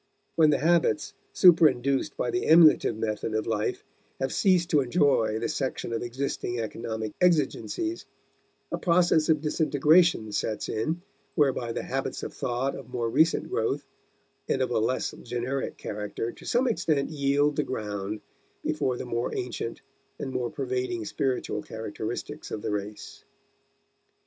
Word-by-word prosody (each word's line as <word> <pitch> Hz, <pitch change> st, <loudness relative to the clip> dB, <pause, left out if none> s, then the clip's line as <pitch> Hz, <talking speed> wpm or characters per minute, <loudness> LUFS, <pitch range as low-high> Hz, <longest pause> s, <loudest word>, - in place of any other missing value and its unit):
When 160 Hz, -2 st, +5 dB
the 150 Hz, -, +3 dB
habits 165 Hz, -1 st, +2 dB, 0.2 s
superinduced 140 Hz, -7 st, +4 dB
by 120 Hz, -, -1 dB
the 180 Hz, -, -1 dB
emulative 160 Hz, -8 st, +6 dB
method 110 Hz, 0 st, -2 dB
of 110 Hz, -, 0 dB
life 110 Hz, -2 st, -1 dB, 0.4 s
have 135 Hz, 0 st, -1 dB
ceased 180 Hz, -3 st, +3 dB
to 150 Hz, -3 st, +5 dB
enjoy 125 Hz, -6 st, +2 dB
the 115 Hz, +1 st, -1 dB
section 130 Hz, -3 st, -3 dB
of 115 Hz, -, -1 dB
existing 120 Hz, -1 st, -3 dB
economic 110 Hz, 0 st, -4 dB
exigencies, 180 Hz, -, +1 dB, 0.6 s
a -, -, -2 dB
process 170 Hz, -3 st, +3 dB
of 155 Hz, -2 st, +3 dB
disintegration 155 Hz, -4 st, +3 dB
sets 110 Hz, +1 st, -2 dB
in 160 Hz, +11 st, -2 dB, 0.3 s
whereby 135 Hz, -6 st, +1 dB
the -, -, -3 dB
habits -, -, -3 dB
of -, -, -5 dB
thought 125 Hz, +3 st, -1 dB
of 130 Hz, -3 st, -10 dB
more 120 Hz, -2 st, -2 dB
recent 160 Hz, +6 st, +3 dB
growth 135 Hz, +6 st, -1 dB, 0.6 s
and -, -, +2 dB
of 125 Hz, -, -2 dB
a 120 Hz, -, +2 dB
less 115 Hz, +4 st, 0 dB
generic 125 Hz, +3 st, -3 dB
character 105 Hz, +2 st, -4 dB
to -, -, -15 dB
some 250 Hz, +2 st, +2 dB
extent 155 Hz, -, 0 dB
yield 145 Hz, 0 st, +2 dB
the 150 Hz, -, +2 dB
ground 105 Hz, -5 st, -4 dB, 0.4 s
before 125 Hz, -2 st, 0 dB
the -, -, -5 dB
more 120 Hz, 0 st, -2 dB
ancient 120 Hz, -1 st, -4 dB, 0.4 s
and 135 Hz, -, -4 dB
more 125 Hz, -2 st, -2 dB
pervading 125 Hz, -4 st, -3 dB
spiritual 130 Hz, +4 st, -1 dB
characteristics 110 Hz, +7 st, -6 dB
of 105 Hz, -, -5 dB
the -, -, -2 dB
race. 105 Hz, +1 st, -6 dB
130 Hz, 145 wpm, -27 LUFS, 115-155 Hz, 0.6 s, emulative